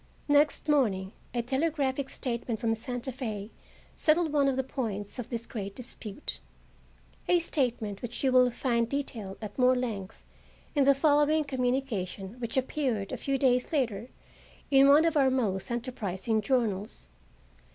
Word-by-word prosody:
Next 290 +1 +3
morning 205 -11 +2 0.2
a 240 -1 -1
telegraphic 275 0 0
statement 235 -3 -3
from 230 -2 +1
Santa 245 +3 -4
Fe 220 -5 -5 0.4
settled 315 0 +2
one 285 -2 +3
of 270 - +2
the 265 - 0
points 220 -5 -4
of 245 - -5
this 230 -1 -3
great 200 -4 -6
dispute, 240 -1 -6 0.9
a 355 - +5
statement 240 - -1
which 240 +2 -5
you 265 - +3
will 250 -1 +6
find 235 -1 0
detailed 235 -8 -4
at 210 +3 -7
more 255 0 +5
length 220 -7 -4 0.5
in 285 -3 +3
the 280 0 +6
following 295 +2 +3
communication, 245 -8 -2
which 235 +1 -3
appeared 255 -6 -1
a - - -2
few 275 -1 -1
days 250 0 +2
later 240 -6 -1 0.6
in 275 0 +7
one 295 +3 +7
of 330 -1 +1
our 275 -3 +5
most 215 -8 -1
enterprising 225 -3 -2
journals. 215 -4 -1
250 Hz, 150 wpm, -29 LUFS, 220-275 Hz, 0.9 s, in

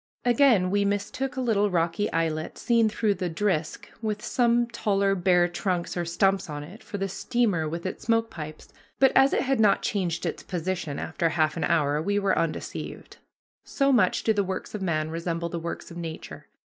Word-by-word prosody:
Again 240 -7 +4
we 205 0 +2
mistook 205 +7 -2
a - - 0
little 210 -4 +2
rocky 175 +3 0
islet 160 -1 -1
seen 230 -2 +3
through 215 0 +1
the 180 -2 -3
"drisk," 165 -3 -1 0.2
with 215 -1 -3
some 240 -1 +2
taller 200 -4 +1
bare 180 -2 +3
trunks 175 0 -2
or 175 -1 -1
stumps 190 +2 +1
on 145 -1 -5
it, 185 +10 -12
for 205 - -6
the 195 0 -1
steamer 195 -5 0
with 170 +3 -5
its 185 - -5
smoke 225 0 +1
pipes, 155 -1 -8 0.3
but 270 -1 +5
as 270 +1 +5
it - - +2
had 270 -2 0
not 210 -2 +4
changed 180 -5 -1
its - - -3
position 175 -4 -3
after 165 +1 -1
half 155 -2 +1
an 165 - -1
hour 150 -2 +2
we 205 +5 0
were 200 -1 +2
undeceived. 165 -2 -4 0.5
So 275 -1 +1
much 215 -9 +3
do 220 - +3
the 205 -1 +1
works 190 0 -5
of 210 - -4
man 155 -4 -1
resemble 170 0 -3
the 170 - -4
works 170 +1 -6
of 170 - -9
nature. 165 -2 -7
190 Hz, 195 wpm, -26 LUFS, 165-215 Hz, 0.5 s, but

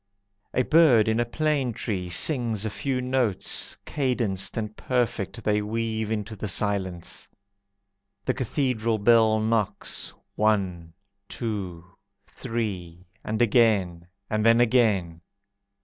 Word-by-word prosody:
A 130 - +3
bird 140 -8 +5
in 110 +1 +1
a 120 - +2
plane 140 -1 0
tree 95 -5 -3
Sings 115 - +2
a 110 - -2
few 130 +3 -2
notes, 125 -6 0
Cadenced 120 -10 -1
and 110 -1 -3
perfect 115 -3 -2
They 105 0 +1
weave 110 0 -2
into 110 0 -3
the 105 - -5
silence. 95 -3 -2 1.0
The - - +1
Cathedral 120 -3 -1
bell 110 0 +4
knocks, 110 -2 -1 0.2
One, 95 -6 0 0.4
two, 95 -7 -4 0.4
three, 95 -9 -5 0.2
and 110 +2 0
again, 100 -8 +2 0.2
And 110 0 -1
then 115 +1 +5
again. 105 -9 +2
110 Hz, 115 wpm, -25 LUFS, 100-120 Hz, 1.0 s, bird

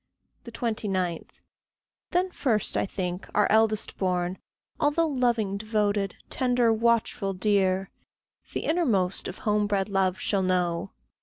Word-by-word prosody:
29. 195 -7 -2 0.8
Then 365 +1 +1
first, 225 - 0
I - - +1
think, 180 -1 -4
our 210 - +4
eldest 220 0 +2
born, 180 -1 -1 0.4
although 295 +3 +2
Loving, 240 -8 0
devoted, 205 -2 0
tender, 245 -3 +2
watchful, 225 -3 +1
dear, 190 -1 +1 0.6
The - - -2
innermost 225 - +1
of 185 - -6
home 210 -1 +2
bred 200 0 0
love 190 -2 +1
shall 200 -2 0
know! 180 - 0
205 Hz, 120 wpm, -27 LUFS, 185-230 Hz, 0.8 s, our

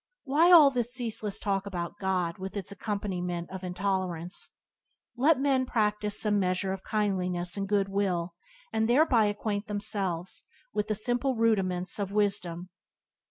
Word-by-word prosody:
Why 315 +5 +4
all 310 -5 +9
this 245 -2 -1
ceaseless 220 -4 -1
talk 195 -1 -1
about 180 0 -5
God, 185 -3 -1
with 190 +2 -5
its 200 0 -4
accompaniment 185 -4 -3
of 190 0 -7
intolerance? 180 -1 -2 0.7
Let 275 +3 +4
men 270 -2 +2
practice 210 -2 0
some 210 -2 +2
measure 185 0 0
of 190 - -7
kindliness 180 -4 -1
and 195 -1 -3
good 200 -1 +2
will, 185 -3 -1 0.4
and 220 +1 +1
thereby 245 -4 +4
acquaint 205 0 -2
themselves 195 -4 -2 0.3
with 210 - -1
the 215 - 0
simple 245 +4 0
rudiments 195 -5 +1
of 200 -1 -2
wisdom. 195 -4 -1
200 Hz, 145 wpm, -29 LUFS, 185-220 Hz, 0.7 s, all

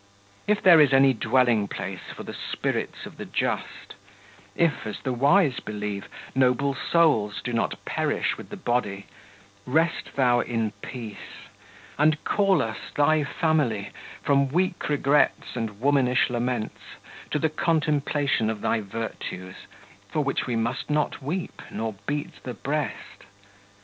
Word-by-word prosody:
46 210 0 +4
If - - -13
there 170 -4 +8
is 140 -2 +5
any 135 0 +6
dwelling 115 -2 +2
place 95 -2 -6
for - - -7
the - - -7
spirits - - -3
of - - -11
the - - -6
just; - - -3 0.6
if, 165 -9 +1
as 105 - -5
the 130 - -1
wise 140 +3 +3
believe, 105 -1 -5 0.2
noble 130 +1 +2
souls 135 -11 +2
do 120 - -3
not 115 - 0
perish - - 0
with - - -11
the - - -7
body, 100 -5 -1 0.6
rest 160 +6 0
thou 125 -3 +4
in 115 -3 -1
peace; 115 -5 -8 0.5
and 155 0 +3
call 195 -2 +3
us, 110 0 -4 0.2
thy 150 +1 +3
family, 140 - 0 0.3
from 140 -1 +3
weak 175 +3 0
regrets 145 -2 +2
and 110 -4 -4
womanish 130 -2 +3
laments 120 -2 -3 0.3
to - - 0
the 160 +2 +1
contemplation 150 -6 +1
of 110 -2 -3
thy 115 - +1
virtues, 100 -3 -6 0.4
for 150 - 0
which 135 -1 -1
we 120 - -1
must 115 +5 -2
not 150 0 0
weep 170 +7 -4
nor 110 -1 -3
beat 145 0 -3
the 125 - -6
breast. 150 -6 -4
130 Hz, 145 wpm, -25 LUFS, 115-150 Hz, 0.6 s, there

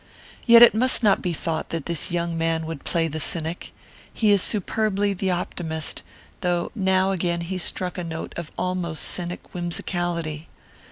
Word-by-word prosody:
"Yet 235 0 +9
it 240 - +8
must 245 +2 +2
not 205 -2 +4
be 180 - -1
thought 160 -1 -3
that 165 -3 -4
this 170 -2 0
young 170 -1 -1
man 165 0 -1
would 160 -3 -6
play 165 -1 0
the 155 0 -5
cynic. 165 +2 -2 0.4
He 215 -2 +2
is 200 -2 +5
superbly 205 0 +1
the 190 0 -2
optimist, 165 -3 -2 0.4
though 175 -1 -1
now 190 -3 +2
again 170 -2 -1
he 185 +2 -4
struck 180 0 -1
a - - -3
note 160 -1 -6
of 170 -3 -6
almost 180 -3 -1
cynic 175 0 0
whimsicality. 170 -2 -3
175 Hz, 165 wpm, -23 LUFS, 165-190 Hz, 0.4 s, Yet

